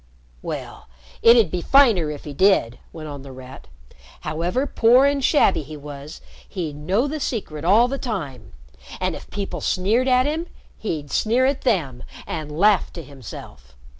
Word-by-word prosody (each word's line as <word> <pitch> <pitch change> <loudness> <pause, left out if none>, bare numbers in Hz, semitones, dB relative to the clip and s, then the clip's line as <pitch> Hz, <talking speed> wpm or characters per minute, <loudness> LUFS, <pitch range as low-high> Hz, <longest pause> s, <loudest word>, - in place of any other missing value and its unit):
"Well, - - -7 0.3
it'd 230 -6 +6
be 180 - -2
finer 225 - +4
if 150 -1 -7
he 145 - -7
did," 140 - +2
went 160 -2 -8
on 145 -2 -7
The 135 0 -11
Rat. 130 - -12 0.5
"However 170 - -1
poor 250 0 +4
and 280 -1 +1
shabby 290 - +3
he 150 +1 -9
was, 145 +1 -10 0.3
he'd 165 -6 -4
know 185 - 0
the 305 +2 -4
secret 175 - -4
all 210 +8 +5
the 275 +2 -4
time. 155 - -5 0.5
And - - -1
if - - -11
people 200 0 -5
sneered 220 +8 +1
at 255 0 +4
him, 320 +4 -2 0.3
he'd 155 -9 -4
sneer 240 +4 +2
at 270 0 0
them 155 - 0 0.2
and 155 -3 -5
laugh 195 +5 +3
to 165 - -7
himself. 110 - -12
180 Hz, 165 wpm, -22 LUFS, 145-240 Hz, 0.5 s, it'd